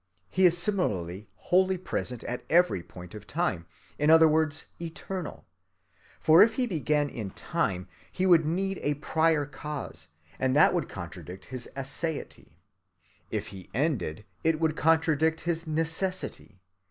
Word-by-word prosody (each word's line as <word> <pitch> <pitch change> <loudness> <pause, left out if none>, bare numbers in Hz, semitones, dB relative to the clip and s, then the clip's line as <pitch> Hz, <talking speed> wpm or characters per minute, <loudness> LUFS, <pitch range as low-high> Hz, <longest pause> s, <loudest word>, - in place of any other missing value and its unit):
He 185 0 +4
is 175 0 +4
similarly 105 - 0
wholly 185 - +2
present 125 -9 -3
at 125 - -4
every 175 - +4
point 90 0 -12
of 105 -1 -10
time,—in 145 - -2
other 160 0 +8
words 155 0 +1 0.2
eternal. 170 +1 -6 0.7
For 160 +2 +6
if 220 +1 +5
He 255 - +1
began 150 - 0
in 110 -7 -5
time, 90 0 -2 0.2
He 185 - -1
would 170 -3 +6
need 190 +5 -1
a 145 0 0
prior 160 0 +1
cause, 150 0 -6 0.3
and 130 0 +1
that 150 - +6
would - - -1
contradict 90 +2 -8
his 125 -2 -4
aseity. 145 +3 -4 0.8
If - - -3
He 95 -2 -11
ended, 115 - -1 0.2
it 160 -1 +2
would 160 -1 +1
contradict 160 0 +2
his 165 0 -2
necessity. 165 - -3
155 Hz, 140 wpm, -28 LUFS, 125-170 Hz, 0.8 s, other